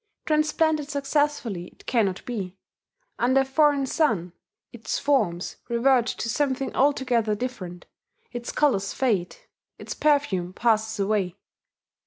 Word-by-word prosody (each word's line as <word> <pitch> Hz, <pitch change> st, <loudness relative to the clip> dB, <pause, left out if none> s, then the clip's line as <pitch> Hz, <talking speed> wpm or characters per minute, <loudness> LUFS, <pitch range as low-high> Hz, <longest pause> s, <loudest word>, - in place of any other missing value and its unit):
Transplanted 305 Hz, -1 st, +1 dB
successfully 280 Hz, -, -1 dB
it -, -, -20 dB
cannot 200 Hz, -7 st, 0 dB
be: 195 Hz, -6 st, -5 dB, 0.6 s
under 260 Hz, +3 st, +4 dB
a -, -, -1 dB
foreign 285 Hz, 0 st, +3 dB
sun 215 Hz, -, 0 dB, 0.4 s
its 230 Hz, -1 st, -3 dB
forms 215 Hz, -12 st, 0 dB
revert 240 Hz, 0 st, +3 dB
to -, -, -3 dB
something 265 Hz, +2 st, -1 dB
altogether 250 Hz, -6 st, +2 dB
different, 195 Hz, -7 st, -6 dB, 0.5 s
its 240 Hz, 0 st, -5 dB
colours 200 Hz, -10 st, +1 dB
fade, 205 Hz, -9 st, 0 dB, 0.4 s
its -, -, -6 dB
perfume 275 Hz, -13 st, +1 dB
passes 220 Hz, -1 st, +1 dB
away. 195 Hz, -3 st, 0 dB
240 Hz, 115 wpm, -25 LUFS, 200-280 Hz, 0.6 s, under